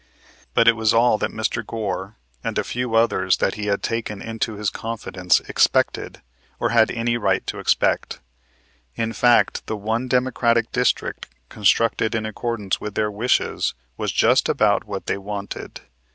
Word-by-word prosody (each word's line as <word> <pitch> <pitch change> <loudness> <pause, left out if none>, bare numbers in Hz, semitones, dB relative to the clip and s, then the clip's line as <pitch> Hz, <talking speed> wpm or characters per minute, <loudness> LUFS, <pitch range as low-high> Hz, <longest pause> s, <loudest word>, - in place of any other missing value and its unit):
But 115 - +4
it 115 - +7
was 110 -1 +2
all 115 -1 +4
that - - -1
Mr. 110 +1 -2
Goar 100 -2 -4 0.3
and - - -3
a - - +1
few 125 -2 -3
others 95 -5 +3
that 95 - +1
he 105 -1 -5
had 100 -1 0
taken 115 -3 -3
into 115 +1 -3
his 105 -1 -2
confidence 100 -6 0
expected, - - 0 0.4
or 120 - +1
had 115 -1 +4
any 120 0 -1
right 115 - 0
to - - -5
expect. - - +1 0.8
In 115 0 -2
fact, 120 0 +3
the 110 - -3
one 110 +5 -2
Democratic 120 -2 +1
district, 125 0 0 0.2
constructed 110 +2 +2
in 110 -1 -1
accordance 110 -2 -3
with 105 -1 -6
their 105 -1 0
wishes, 115 +5 0 0.2
was - - -2
just - - +3
about - - +2
what - - -6
they 100 - -2
wanted. 100 0 -6
110 Hz, 160 wpm, -22 LUFS, 105-115 Hz, 0.8 s, it